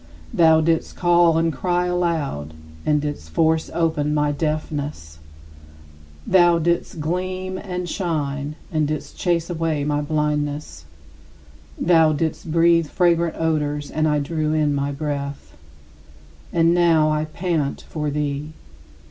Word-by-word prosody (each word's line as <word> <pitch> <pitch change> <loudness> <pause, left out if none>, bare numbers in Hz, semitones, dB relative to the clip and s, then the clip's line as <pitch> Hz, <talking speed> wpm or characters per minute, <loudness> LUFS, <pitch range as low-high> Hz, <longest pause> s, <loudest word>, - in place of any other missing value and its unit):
Thou 160 -1 +5
didst 165 0 0
call 175 -2 +4
and 165 -1 +1
cry 175 +6 0
aloud, 160 - -2 0.3
and 150 -1 +3
didst 145 - -5
force 160 - +1
open 150 -3 0
my 150 0 +2
deafness. 145 - -3 1.1
Thou 175 -2 +5
didst 170 0 -1
gleam 185 +3 -3
and 180 -2 -4
shine, 150 -5 -2 0.2
and 155 -3 +1
didst 155 -1 -5
chase 170 -2 0
away 165 -4 -1
my 145 0 0
blindness. 150 - -2 0.9
Thou 165 -2 +4
didst 160 +1 -3
breathe 165 0 +4
fragrant 170 0 +1
odors 150 -2 -1
and 155 0 +1
I 150 -1 +2
drew 155 +1 -1
in 150 -2 +2
my 140 0 -1
breath; 140 - -5 1.0
and 165 0 +3
now 165 -3 +4
I 155 0 0
pant 155 -3 -2
for 150 -2 -3
thee. 145 +1 -3
155 Hz, 125 wpm, -22 LUFS, 145-170 Hz, 1.1 s, Thou